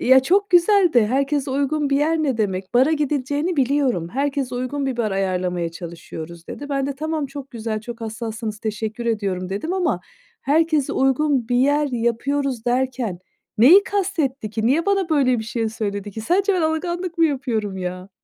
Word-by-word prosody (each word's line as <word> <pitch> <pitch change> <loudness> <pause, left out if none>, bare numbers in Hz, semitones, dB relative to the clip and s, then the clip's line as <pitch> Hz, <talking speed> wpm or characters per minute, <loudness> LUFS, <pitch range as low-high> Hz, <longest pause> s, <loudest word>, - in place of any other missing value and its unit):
ya, 260 +1 +6
çok 390 +9 +2
güzel 360 +1 +5
de 230 -4 +5
herkese 275 +3 0
uygun 280 +2 0
bir 275 - +3
yer 320 +2 +2
ne 270 -6 0
demek, 190 0 -2
bara 265 +6 +5
gidileceğini 295 +3 -1
biliyorum, 260 - +1
"Herkese 275 +2 -2
uygun 270 +3 -2
bir 260 -2 -2
bar 220 -3 0
ayarlamaya 180 -3 -1
çalışıyoruz." 165 0 -9
dedi. 285 0 -7
Ben 275 -1 -1
de: 280 - -3
"Tamam 310 -1 -2
çok 275 0 -9
güzel, 220 -2 -4
çok 235 +1 -8
hassassınız, 220 -1 -5
teşekkür 220 +1 -4
ediyorum." 195 -5 -1
dedim 210 - -3
ama 370 -2 0 0.4
"Herkese 310 0 +2
uygun 270 -2 +1
bir 245 - +1
yer 290 +3 +3
yapıyoruz." 245 +2 -1
derken 245 -6 -1 0.4
neyi 320 - +8
kastetti 320 - -1
ki? 220 +1 -1
Niye 320 +8 +2
bana 390 -3 +1
böyle 260 -5 +3
bir 220 - -4
şey 225 0 -2
söyledi 205 -2 -4
ki? 220 - -7
Sadece 380 - +2
ben 350 - +1
alınganlık 345 +2 -2
mı 330 - +5
yapıyorum, 225 -9 -2
ya? 185 +1 -5
260 Hz, 175 wpm, -22 LUFS, 220-295 Hz, 0.4 s, neyi